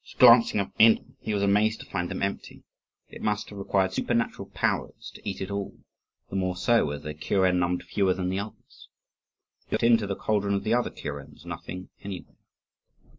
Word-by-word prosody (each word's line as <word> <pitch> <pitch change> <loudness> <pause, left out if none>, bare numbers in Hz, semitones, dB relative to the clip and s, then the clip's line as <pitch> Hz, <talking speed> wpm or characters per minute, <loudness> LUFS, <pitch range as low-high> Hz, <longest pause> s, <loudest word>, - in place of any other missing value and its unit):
Glancing 115 -3 +7 0.2
into 110 0 +7
them, - - -24
he 110 - -3
was 100 - 0
amazed 105 +2 +3
to - - -9
find 90 -2 -3
them - - -3
empty. 100 0 -4 0.5
It - - -11
must 105 0 -1
have 100 - -9
required 95 -1 +1
supernatural 115 +3 -1
powers - - -2
to - - -6
eat 95 - -5
it 95 +1 -4
all; 100 -1 -4 0.5
the - - -4
more 95 -1 0
so, 115 -3 +3
as 70 0 -5
their 75 - -5
kuren 90 +4 +1
numbered 90 0 0
fewer 95 0 +1
than 90 -1 -2
the 95 +1 -1
others. 105 +1 -10 0.8
He - - -8
looked - - 0
into 115 -3 +4
the 100 - -2
cauldron 100 -1 0
of 100 - -2
the 110 - +1
other 120 0 +2
kurens 70 -1 -8
nothing 90 0 -7
anywhere. 100 -3 -8
100 Hz, 190 wpm, -27 LUFS, 90-110 Hz, 0.8 s, Glancing